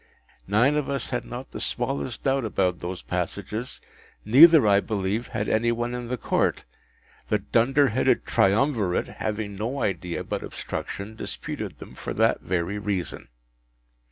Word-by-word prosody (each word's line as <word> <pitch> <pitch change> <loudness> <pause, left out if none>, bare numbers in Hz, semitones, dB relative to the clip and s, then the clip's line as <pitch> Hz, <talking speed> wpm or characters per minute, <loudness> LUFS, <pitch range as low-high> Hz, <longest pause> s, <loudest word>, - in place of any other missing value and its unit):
Nine 120 +9 +3
of 150 -2 -1
us 140 -3 -2
had 125 - -2
not 125 +2 -7
the - - -6
smallest 125 0 -2
doubt 135 -1 +1
about 95 -5 0
those 90 +1 -5
passages, 115 +4 -4 0.5
neither, 145 +5 +8
I 100 -1 +5
believe, 105 +2 -2
had 110 -1 -3
any 115 +2 +2
one 120 +1 -2
in 125 -1 -4
the 125 +1 -2
Court; - - 0 0.7
the 105 - +3
dunder 130 +7 +3
headed 120 +4 +2
triumvirate, 105 -2 +2
having 105 -1 -2
no 120 +7 -2
idea 90 -3 -2
but - - -3
obstruction, 100 +3 -6
disputed - - -5
them - - -11
for - - -6
that - - +2
very 90 +3 -2
reason. 100 -4 -3
110 Hz, 150 wpm, -25 LUFS, 100-125 Hz, 0.7 s, neither